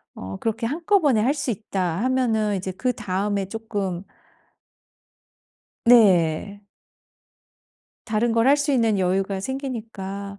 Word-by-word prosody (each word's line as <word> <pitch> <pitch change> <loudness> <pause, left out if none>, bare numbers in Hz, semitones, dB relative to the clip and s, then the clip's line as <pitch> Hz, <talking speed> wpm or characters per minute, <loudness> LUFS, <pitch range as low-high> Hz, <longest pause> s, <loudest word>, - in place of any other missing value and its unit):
어 95 +1 -7
그렇게 225 +1 -2
한꺼번에 315 - +2
할 260 +5 +2
수 280 -4 -2
있다 190 -3 -3
하면은 225 -5 +1
이제 190 0 -4
그다음에 205 -3 -2
쪼끔 200 -5 -4 1.8
네. 200 -3 +4 1.4
다른 225 +2 0
걸 230 +2 +2
할 285 - +6
수 290 0 0
있는 225 -6 +2
여유가 190 +1 0
생기니까. 205 -6 -6
215 Hz, 220 characters per minute, -23 LUFS, 195-245 Hz, 1.8 s, 할